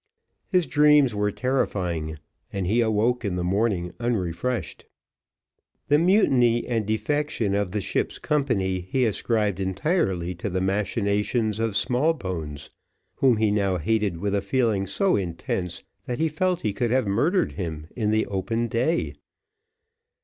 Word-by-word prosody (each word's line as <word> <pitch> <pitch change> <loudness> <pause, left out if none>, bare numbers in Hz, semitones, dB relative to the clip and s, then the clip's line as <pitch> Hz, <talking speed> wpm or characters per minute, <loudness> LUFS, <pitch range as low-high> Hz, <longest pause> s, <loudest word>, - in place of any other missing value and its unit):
His 180 -3 +2
dreams 150 -5 +4
were 105 0 0
terrifying, 90 -12 -1 0.3
and 95 -2 -2
he 110 +6 +2
awoke 115 +2 +1
in 100 -4 -1
the 90 - -2
morning 95 -2 0
unrefreshed. 120 +1 -2 1.0
The 145 +1 +5
mutiny 130 - +3
and 115 -4 -1
defection 115 -1 0
of 100 -1 0
the 105 +3 -2
ship's - - -2
company, 115 -12 0
he 130 +2 +2
ascribed 105 -2 0
entirely 95 - 0
to 90 +4 -4
the 95 0 -1
machinations 105 +3 0
of 115 -3 -1
Smallbones, 95 - -1 0.5
whom 130 -4 +4
he 110 -1 +2
now 100 -3 +1
hated 105 0 0
with 100 +3 -2
a 100 - +1
feeling 100 -2 0
so 185 - +1
intense, 90 -1 -3 0.2
that 125 - -2
he 160 - +1
felt 180 +3 0
he 105 - -1
could 120 +4 -1
have 130 +1 +2
murdered 150 - +1
him 80 -5 -5
in 110 -4 0
the 110 0 +2
open 115 +4 -2
day. 125 +9 0
105 Hz, 140 wpm, -25 LUFS, 95-125 Hz, 1.0 s, The